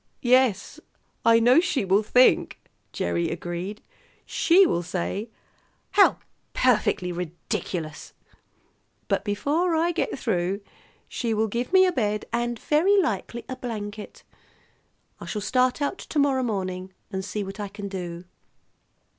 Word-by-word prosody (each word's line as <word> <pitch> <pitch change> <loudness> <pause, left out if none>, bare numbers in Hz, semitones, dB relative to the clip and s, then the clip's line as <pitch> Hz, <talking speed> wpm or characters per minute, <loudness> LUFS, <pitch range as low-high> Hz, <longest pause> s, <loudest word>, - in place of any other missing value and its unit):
"Yes, 250 0 +2 0.4
I 230 0 +6
know 245 +6 +6
she 290 - 0
will 195 +2 +3
think," 250 +4 +3 0.3
Gerry 85 0 -1
agreed. 175 +4 -5 0.4
"She 370 +3 +4
will 175 - 0
say, 185 +5 -3 0.6
'How 405 - +5 0.4
perfectly 210 -7 +2
ridiculous!' 170 -2 -5 1.0
But - - 0
before 295 - 0
I 335 +2 +2
get 345 - -2
through 195 -4 -1 0.5
she 230 -3 -2
will 220 +1 +1
give 235 - -3
me 375 0 +6
a 365 - +2
bed 210 -8 -1
and 240 0 -1
very 355 - +3
likely 245 -8 -2
a 260 - -5
blanket. 215 -4 -7 1.0
I - - -9
shall 210 - -3
start 255 +6 +1
out 285 - -2
to - - -6
morrow 280 -2 +3
morning 190 -5 -3 0.2
and 190 -1 -3
see 205 +2 -3
what 195 +2 -8
I 205 - -3
can 200 0 -7
do." 175 -3 -6
220 Hz, 135 wpm, -25 LUFS, 190-260 Hz, 1.0 s, I